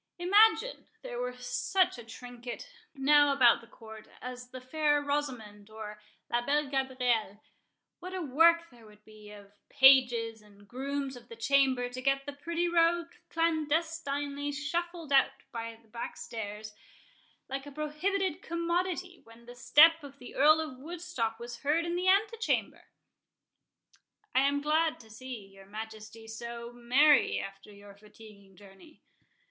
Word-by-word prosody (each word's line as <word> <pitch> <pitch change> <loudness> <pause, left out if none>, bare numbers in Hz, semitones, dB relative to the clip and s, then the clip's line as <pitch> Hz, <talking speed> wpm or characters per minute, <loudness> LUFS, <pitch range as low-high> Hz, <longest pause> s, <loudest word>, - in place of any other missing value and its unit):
—Imagine 425 +7 +3 0.2
there 240 - -6
were 250 0 -4
such 350 +5 0
a - - -9
trinket 245 - -9 0.3
now 290 +1 +5
about 250 -5 +5
the 230 - -16
Court 220 -2 -13
as 250 0 -8
the 255 0 -8
Fair 295 +3 +1
Rosamond, 250 -8 -4
or 215 -1 -9 0.3
La 240 0 +2
Belle 290 +3 +1
Gabrielle, 250 -6 0 0.6
what 365 +1 -8
a 375 - -4
work 335 +2 +3
there 235 -3 -17
would 210 0 -19
be 215 -1 -14
of 205 -1 -14 0.2
pages, 245 -4 +5
and 205 -1 -20
grooms 275 +3 -4
of 240 -1 -14
the 230 - -9
chamber, 255 +1 +2
to 250 +1 -7
get 275 +1 +1
the 285 - -6
pretty 335 +4 -2
rogue 340 0 +2 0.2
clandestinely 310 -3 -1
shuffled 335 +2 -4
out 270 - +6 0.2
by 230 -1 -6
the 230 - -27
backstairs, 215 -1 -7 0.7
like 270 +1 -5
a - - -8
prohibited 335 +5 -2
commodity, 350 +1 -2
when 230 +1 -17
the 245 - -10
step 295 +7 +5
of 280 -1 -11
the 250 - -11
Earl 305 +3 +5
of 260 -5 -7
Woodstock 315 -8 -4
was 240 +1 -8
heard 310 +4 +1
in 340 0 -2
the 360 +1 -1
antechamber!" 425 +4 +1 1.5
"I 260 - +4
am 285 0 0
glad 310 +1 +1
to 220 -1 -17
see 240 -2 -8
your 195 0 -17
Majesty 220 +1 -9
so—merry 235 +5 +2
after 195 +1 -9
your 200 0 -14
fatiguing 205 -1 -17
journey." 200 - -17
265 Hz, 145 wpm, -30 LUFS, 230-310 Hz, 1.5 s, out